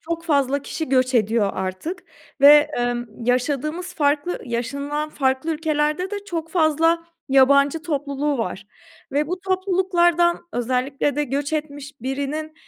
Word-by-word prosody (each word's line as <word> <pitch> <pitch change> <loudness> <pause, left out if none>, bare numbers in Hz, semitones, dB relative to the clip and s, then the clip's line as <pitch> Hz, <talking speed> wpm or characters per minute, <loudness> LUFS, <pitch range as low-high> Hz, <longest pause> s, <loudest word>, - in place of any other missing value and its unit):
çok 335 0 -5
fazla 280 -3 +1
kişi 320 +1 -5
göç 255 -1 +2
ediyor 215 -2 +2
artık 190 - -4 0.4
ve, 295 +1 +8
emm, 240 0 -1 0.2
yaşadığımız 300 +8 -1
farklı 295 +4 0
yaşanılan 280 +6 -3
farklı 265 +2 0
ülkelerde 305 +3 -1
de 410 - -3
çok 330 -4 -5
fazla 330 0 +2 0.2
yabancı 280 +3 +4
topluluğu 290 -3 -2
var 200 -2 -4 0.5
ve 295 +2 +1
bu 360 +3 -4
topluluklardan 365 -2 +2
özellikle 260 +3 -1
de 295 - +1
göç 280 +3 -3
etmiş 290 -2 -4
birinin, 285 +5 -4
290 Hz, 130 wpm, -22 LUFS, 265-330 Hz, 0.5 s, ve